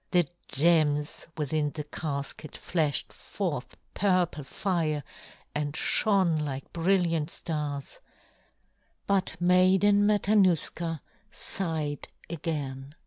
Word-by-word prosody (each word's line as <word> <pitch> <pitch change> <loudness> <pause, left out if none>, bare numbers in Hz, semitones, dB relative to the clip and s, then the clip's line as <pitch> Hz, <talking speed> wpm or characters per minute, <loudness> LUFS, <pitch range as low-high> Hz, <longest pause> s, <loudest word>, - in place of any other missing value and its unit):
The 175 -4 +3 0.2
gems 150 -1 +2
within 150 0 0
the 150 - -3
casket 145 0 -5
flashed 155 -5 0
forth - - -4 0.2
purple 180 -6 +1
fire 155 -2 -1 0.5
and 150 0 -2
shone 190 -7 +3
like 140 -3 -5
brilliant 170 -3 +1
stars; 150 -5 -4 1.1
but 190 -4 0
Maiden 190 +3 +5
Matanuska 185 -6 +2 0.3
sighed 160 -6 -3 0.2
again. 145 -4 -4
160 Hz, 85 wpm, -28 LUFS, 150-180 Hz, 1.1 s, Maiden